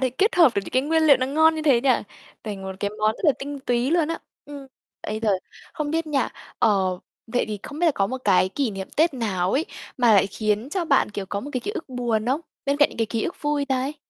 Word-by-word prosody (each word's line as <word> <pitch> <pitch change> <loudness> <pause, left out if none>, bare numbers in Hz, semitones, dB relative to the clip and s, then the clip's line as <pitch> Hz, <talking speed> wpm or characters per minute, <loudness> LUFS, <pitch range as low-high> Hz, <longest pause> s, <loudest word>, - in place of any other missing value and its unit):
thể 260 -1 +1
kết 395 - +1
hợp 330 -8 +6
được 200 - 0
những - - -8
cái 255 - +3
nguyên 320 +3 +2
liệu 290 -3 +7
nó 255 - -1
ngon 315 +4 +4
như 315 - -3
thế 270 -6 +4
nhỉ? 265 +1 +2 0.5
Thành 205 -3 -5
một 190 - -5
cái 205 - -1
món 215 0 +3
rất - - -8
là 300 - +6
tinh 285 0 -6
túy 245 0 0
luôn 330 -2 +2
á. 330 - -2 0.3
Ừm, 285 -1 -9 0.4
bây 215 +1 -4
giờ 220 - +1 0.4
không 300 -2 -3
biết 325 +1 -1
nha, 290 -3 0 0.3
ờ, 190 -3 +2 0.3
vậy 245 +2 0
thì 210 - -4
không 295 +1 -8
biết 350 - +2
là 320 - +4
có 195 - +1
một 260 +4 -4
cái 190 -2 +4
kỷ 260 +2 -1
niệm 195 -1 -6
Tết 320 -1 +3
nào 195 -7 -1
ấy 300 +5 +1 0.3
mà 240 -3 +4
lại 195 -1 +5
khiến 215 +4 -1
cho 360 -1 -1
bạn, 275 -8 +2
kiểu, 200 -2 -5
có 200 +1 -3
một 285 - -7
cái 255 - -1
ký 410 - -4
ức 330 -8 -6
buồn 240 -4 -1
không? 265 +5 +1 0.2
Bên 280 0 +1
cạnh 290 0 +5
những - - -13
cái 225 - +1
ký 225 -1 -2
ức 360 - -3
vui 295 -1 0
đây. 265 +2 -1
260 Hz, 275 wpm, -24 LUFS, 215-295 Hz, 0.5 s, liệu